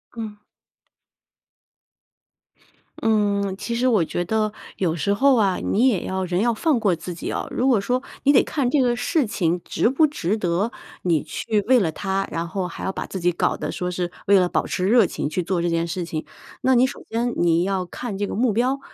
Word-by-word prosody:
嗯。 220 -2 -6 2.6
嗯， 205 -3 +1
其 235 - -4
实 250 +2 +1
我 210 -9 +3
觉 175 +3 -2
得 215 +3 0 0.2
有 170 -4 0
时 175 +5 0
候 270 +6 +4
啊， 200 -5 +2
你 245 +6 +2
也 210 -8 +1
要 190 0 -2
人 180 0 -1
要 235 +1 +2
放 280 +3 +1
过 200 -6 +2
自 175 +2 -7
己 165 - -5
哦。 - - -3
如 255 - 0
果 240 -7 +4
说 250 +5 0 0.2
你 285 - +5
得 270 - +5
看 275 -5 -1
这 280 +2 +3
个 245 -1 +2
事 290 +4 +1
情 180 -5 0
值 - - +1
不 275 +5 +4
值 220 - -1
得 190 +4 0 0.3
你 165 -4 +1
去 215 -2 -1
为 255 0 +6
了 175 -7 0
它， 195 +3 -2
然 165 +1 -2
后 180 +2 -3
还 180 - -8
要 190 - -1
把 - - -5
自 190 - -5
己 175 0 +2
搞 175 - 0
得 - - -4
说 180 - -3
是 180 0 -3 0.2
为 200 0 +6
了 180 - +3
保 - - -1
持 185 +1 -1
热 230 -3 +5
情 - - -3
去 170 +5 -1
做 175 0 -1
这 175 - 0
件 165 0 0
事 175 +1 -3
情。 155 -2 -4 0.4
那 260 0 +3
你 245 +1 +5
首 260 - -6
先 235 +2 -1
你 170 0 +2
要 190 0 0
看 210 +4 -6
这 205 0 -1
个 - - -4
目 235 +1 +2
标， 255 +5 +1
200 Hz, 235 characters per minute, -23 LUFS, 180-240 Hz, 2.6 s, 为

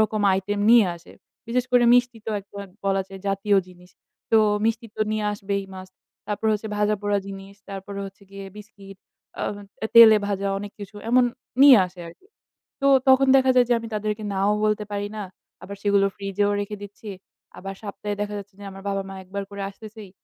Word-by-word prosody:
রকম 215 -1 +1 0.2
item 205 +2 -3
নিয়ে 230 -4 +7
আসে। 170 - -17 0.3
বিশেষ 240 +2 0
করে 245 -1 +5
মিষ্টি 245 -2 +2
তো 220 - -2
একটা 200 +1 -13 0.3
বলা 195 0 +1
যায় 195 0 -10
জাতীয় 195 +1 +1
জিনিস। 180 0 -17 0.4
তো 225 - +6 0.3
মিষ্টি 225 +1 0
তো - - -6
নিয়ে 215 -1 -1
আসবেই, 200 -1 -3
Must. 185 0 -11 0.3
তারপর 210 +1 -3
হচ্ছে 215 +1 -3
ভাজা-পোড়া 205 -1 0
জিনিস। 195 0 -9
তারপরে 195 0 -7
হচ্ছে 195 +1 -14
গিয়ে 195 0 -9
biscuit, 200 -2 -13 0.4
আ - - -3 0.5
তেলে 225 -2 +10
ভাজা 200 -1 -2
অনেক 205 0 -8
কিছু 205 +1 -9
এমন 250 +1 +5 0.4
নিয়ে 270 -6 +9
আসে 180 0 -13
আরকি। 175 - -17 0.6
তো 275 - +3 0.2
তখন 265 +1 +6
দেখা 265 -1 +5
যায় 250 -1 +5
যে, 240 - +5
আমি 230 - -7
তাদেরকে 215 0 -3
নাও 195 +1 +1
বলতে 210 0 0
পারি 205 0 -2
না। 210 - -4 0.4
আবার 200 - -8
সেগুলো 200 -1 +3
fridge 195 0 -7
এও 205 - +2
রেখে 210 +1 -5
দিচ্ছি। 205 +2 -10 0.5
আবার 195 +1 -6
সপ্তাহে 205 0 -5
দেখা 205 0 -3
যাচ্ছে 200 0 -10
যে - - -10
আমার 195 0 -11
বাবা-মা 195 -1 -4
১ - - -24
বার 200 0 -2
করে 200 0 -6
আসতেছেই। 210 0 -12
205 Hz, 190 wpm, -24 LUFS, 195-215 Hz, 0.6 s, তেলে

